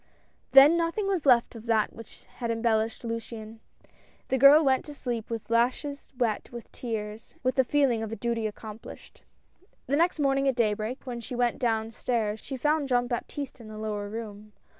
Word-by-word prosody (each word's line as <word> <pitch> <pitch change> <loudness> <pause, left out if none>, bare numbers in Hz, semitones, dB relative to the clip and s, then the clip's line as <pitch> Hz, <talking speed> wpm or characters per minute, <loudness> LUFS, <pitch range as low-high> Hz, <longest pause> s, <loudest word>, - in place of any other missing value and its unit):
Then 275 +4 +9
nothing 335 +5 0
was 370 -7 -1
left 240 -3 +5
of 230 0 -11
that 220 -2 +2
which 230 -1 -13
had 235 -2 -6
embellished 225 -1 0
Luciane. 230 -1 -6 0.7
The 265 - +1
girl 285 +4 +8
went 265 -1 +3
to 295 - -9
sleep 235 -5 -4
with 230 -1 -5
lashes 255 +5 0
wet 230 -4 -1
with 235 -1 -9
tears, 220 -2 -6
and - - -31
with 255 0 +2
the 265 - +3
feeling 255 -4 +2
of 220 -1 -4
a - - -3
duty 230 -1 -1
accomplished. 215 +1 -10 0.6
The 280 - 0
next 340 +4 +2
morning, 275 -2 +2
at 265 - +2
daybreak, 220 +2 -1
when 240 -2 -5
she 245 - -6
went 240 -1 0
down 225 -3 0
stairs, 220 -2 -1
she 270 - -6
found 300 +2 +1
Jean 245 -2 +2
Baptiste 255 +3 -5
in 225 - -11
the 215 0 -9
lower 210 -1 -4
room. 210 -1 -8
235 Hz, 185 wpm, -27 LUFS, 220-270 Hz, 0.7 s, Then